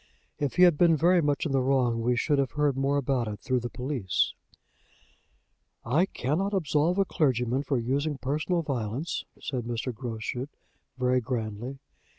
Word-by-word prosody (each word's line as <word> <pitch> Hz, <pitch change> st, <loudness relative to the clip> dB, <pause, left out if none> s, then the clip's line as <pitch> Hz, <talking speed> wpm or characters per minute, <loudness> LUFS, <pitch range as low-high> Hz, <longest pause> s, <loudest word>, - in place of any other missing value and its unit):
If 145 Hz, -3 st, -1 dB
he 180 Hz, -, +6 dB
had 175 Hz, -5 st, +6 dB
been 170 Hz, -2 st, +5 dB
very 175 Hz, +3 st, +4 dB
much 145 Hz, 0 st, 0 dB
in 155 Hz, -, -1 dB
the 135 Hz, -1 st, +2 dB
wrong 125 Hz, -3 st, +2 dB
we 120 Hz, +2 st, +2 dB
should 145 Hz, +4 st, +1 dB
have 135 Hz, -3 st, 0 dB
heard 150 Hz, -2 st, +1 dB
more 135 Hz, +1 st, +1 dB
about 130 Hz, -4 st, 0 dB
it 105 Hz, -1 st, -5 dB
through 130 Hz, -1 st, 0 dB
the 120 Hz, 0 st, -5 dB
police." 125 Hz, -8 st, -1 dB, 1.5 s
"I 155 Hz, +11 st, +2 dB
cannot 190 Hz, +8 st, -1 dB
absolve 160 Hz, 0 st, +1 dB
a 195 Hz, -, +3 dB
clergyman 130 Hz, -6 st, +1 dB
for 140 Hz, -1 st, -1 dB
using 140 Hz, +5 st, -1 dB
personal 155 Hz, +6 st, -1 dB
violence," 130 Hz, +2 st, -3 dB
said 125 Hz, -5 st, -4 dB
Mr. 120 Hz, +1 st, -3 dB
Groschut, 120 Hz, +2 st, -4 dB, 0.5 s
very 125 Hz, 0 st, +2 dB
grandly. 120 Hz, +1 st, -4 dB
135 Hz, 165 wpm, -28 LUFS, 120-150 Hz, 1.5 s, he